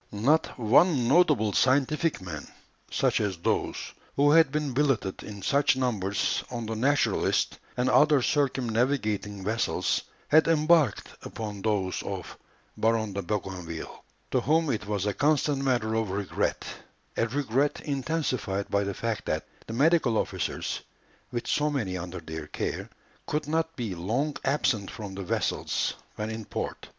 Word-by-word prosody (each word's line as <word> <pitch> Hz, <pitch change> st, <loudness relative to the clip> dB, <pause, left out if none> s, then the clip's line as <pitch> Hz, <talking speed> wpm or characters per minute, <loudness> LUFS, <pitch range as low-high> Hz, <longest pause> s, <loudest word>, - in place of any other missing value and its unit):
Not 130 Hz, +10 st, +1 dB
one 125 Hz, +3 st, +4 dB
notable 135 Hz, -, +4 dB
scientific 145 Hz, -, +2 dB
man, 85 Hz, -5 st, -7 dB, 0.4 s
such -, -, +1 dB
as 100 Hz, -4 st, -1 dB
those 85 Hz, -, 0 dB, 0.4 s
who 145 Hz, +1 st, +4 dB
had 160 Hz, -3 st, +6 dB
been 150 Hz, -2 st, -1 dB
billeted 135 Hz, -8 st, +1 dB
in 100 Hz, -2 st, -9 dB
such 140 Hz, -1 st, +3 dB
numbers 105 Hz, -7 st, 0 dB
on 120 Hz, -2 st, -4 dB
the 110 Hz, +1 st, -3 dB
Naturalist 140 Hz, +6 st, +1 dB, 0.2 s
and 125 Hz, +1 st, +1 dB
other 145 Hz, 0 st, +5 dB
circumnavigating 120 Hz, -7 st, 0 dB
vessels, 115 Hz, +2 st, 0 dB, 0.3 s
had 155 Hz, +2 st, +6 dB
embarked 155 Hz, -6 st, +3 dB
upon 105 Hz, -3 st, -6 dB
those 100 Hz, -4 st, 0 dB
of -, -, -6 dB, 0.4 s
Baron 110 Hz, -2 st, +1 dB
de 100 Hz, -, -2 dB
Bougainville, 90 Hz, -4 st, -5 dB, 0.3 s
to -, -, +2 dB
whom 160 Hz, 0 st, +2 dB
it 105 Hz, -3 st, -3 dB
was 105 Hz, -2 st, -1 dB
a 105 Hz, -, 0 dB
constant 145 Hz, 0 st, +2 dB
matter 120 Hz, -5 st, +1 dB
of 110 Hz, -2 st, 0 dB
regret, 100 Hz, +1 st, -1 dB, 0.5 s
a 115 Hz, -, +1 dB
regret 140 Hz, +2 st, 0 dB
intensified 130 Hz, -9 st, -2 dB
by 100 Hz, 0 st, +2 dB
the 100 Hz, -1 st, -3 dB
fact 115 Hz, -2 st, -3 dB
that -, -, -1 dB, 0.2 s
the 115 Hz, -, -5 dB
medical 140 Hz, -3 st, +3 dB
officers, -, -, -2 dB, 0.5 s
with 120 Hz, -1 st, -3 dB
so 150 Hz, 0 st, +1 dB
many 115 Hz, -11 st, -2 dB
under 90 Hz, 0 st, -5 dB
their 80 Hz, -2 st, -7 dB
care, -, -, -4 dB, 0.4 s
could 150 Hz, 0 st, -1 dB
not 160 Hz, +1 st, 0 dB
be 115 Hz, -6 st, -3 dB
long 120 Hz, -, -1 dB
absent 135 Hz, -7 st, +1 dB
from 100 Hz, -4 st, -7 dB
the 95 Hz, -, -5 dB
vessels 90 Hz, -, -1 dB, 0.2 s
when 105 Hz, +1 st, -3 dB
in 110 Hz, 0 st, -5 dB
port. -, -, -5 dB
120 Hz, 145 wpm, -27 LUFS, 100-145 Hz, 0.5 s, had